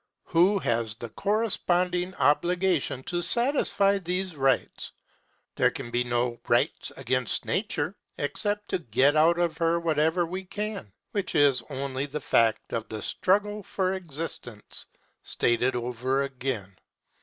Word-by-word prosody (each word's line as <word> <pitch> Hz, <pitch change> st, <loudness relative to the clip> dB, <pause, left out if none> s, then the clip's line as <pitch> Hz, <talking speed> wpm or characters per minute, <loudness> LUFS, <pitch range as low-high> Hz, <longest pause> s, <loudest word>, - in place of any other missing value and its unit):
Who 185 Hz, +5 st, +3 dB
has 115 Hz, -, -1 dB
the 120 Hz, 0 st, -7 dB
corresponding 185 Hz, -, +1 dB
obligation 175 Hz, -3 st, +1 dB
to 175 Hz, +3 st, -2 dB
satisfy 235 Hz, -4 st, +3 dB
these 180 Hz, 0 st, -2 dB
rights? 135 Hz, -2 st, 0 dB, 0.6 s
There -, -, +4 dB
can 120 Hz, -, -7 dB
be 120 Hz, +1 st, +1 dB
no 120 Hz, 0 st, -1 dB
rights -, -, +1 dB
against 130 Hz, -4 st, 0 dB
Nature, -, -, -1 dB, 0.2 s
except 205 Hz, +7 st, -1 dB
to -, -, 0 dB
get 140 Hz, +1 st, +2 dB
out 165 Hz, +3 st, +4 dB
of 170 Hz, -2 st, -1 dB
her 165 Hz, 0 st, +2 dB
whatever 160 Hz, +1 st, +1 dB
we 185 Hz, +3 st, -5 dB
can, 205 Hz, -, -5 dB, 0.2 s
which 195 Hz, -4 st, -2 dB
is 145 Hz, -4 st, +4 dB
only 135 Hz, 0 st, -3 dB
the 150 Hz, +2 st, -4 dB
fact 115 Hz, -5 st, +1 dB
of 115 Hz, -1 st, -3 dB
the 110 Hz, -2 st, -5 dB
struggle 205 Hz, +3 st, +1 dB
for 190 Hz, -1 st, -1 dB
existence 155 Hz, -, -5 dB, 0.3 s
stated 120 Hz, +2 st, +1 dB
over 125 Hz, +3 st, -1 dB
again. 125 Hz, -8 st, -4 dB
160 Hz, 130 wpm, -27 LUFS, 125-185 Hz, 0.6 s, There